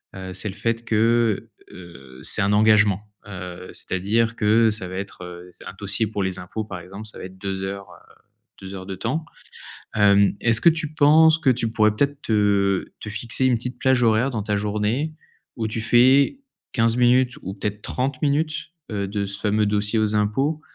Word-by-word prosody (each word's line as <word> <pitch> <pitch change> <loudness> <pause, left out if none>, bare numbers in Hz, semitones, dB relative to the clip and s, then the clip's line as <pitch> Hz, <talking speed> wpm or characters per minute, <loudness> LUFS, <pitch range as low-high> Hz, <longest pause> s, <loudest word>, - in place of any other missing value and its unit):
heu, 95 -1 -7
c'est 95 +2 -4
le 95 - -8
fait 115 +3 -2
que, 115 -1 +1 0.2
heu, 70 -8 -13
c'est - - +3
un 100 0 +2
engagement. 105 -2 +4 0.2
Heu, 90 -2 -8
c'est-à-dire 110 +5 -1
que 110 +1 +3
ça 105 -4 -4
va 95 - -7
être, 95 -1 -7
heu, 90 0 -9
c'est - - -12
un - - -8
dossier 110 - 0
pour 105 -2 -3
les 95 -1 -2
impôts, 90 +5 -5
par 100 -4 -7
exemple, 95 +5 -9
ça 105 - -8
va - - -7
être 95 0 -11
2 95 -1 -4
heures, 100 0 -5
heu, - - -18 0.5
2 95 0 -8
heures 95 -1 -7
de 95 - -5
temps. 155 - -3 0.7
Hem. 100 -1 +4
Est-ce 115 -1 +2
que - - +7
tu 155 -2 -4
penses 155 +2 +6
que 150 -5 +2
tu 115 -2 0
pourrais 110 -1 +2
peut-être 140 +4 0
te 100 -3 +1
te - - -7
fixer 115 +4 -2
une 125 - +3
petite 125 +2 -5
plage 130 -2 +2
horaire 115 +3 +3
dans 115 -5 -3
ta 105 0 -1
journée 105 +9 -1 0.4
où 115 - -2
tu 110 +1 -4
fais 130 - +4 0.3
15 115 0 +2
minutes 125 +1 +3
ou 95 - -5
peut-être 105 +1 -4
30 130 +2 -2
minutes, 155 +2 -1 0.2
heu, 100 -2 -2
de 100 0 -2
ce 100 0 -7
fameux 105 +1 +1
dossier 105 +2 0
aux 110 -1 +1
impôts? 135 +9 0
105 Hz, 200 wpm, -22 LUFS, 100-120 Hz, 0.7 s, que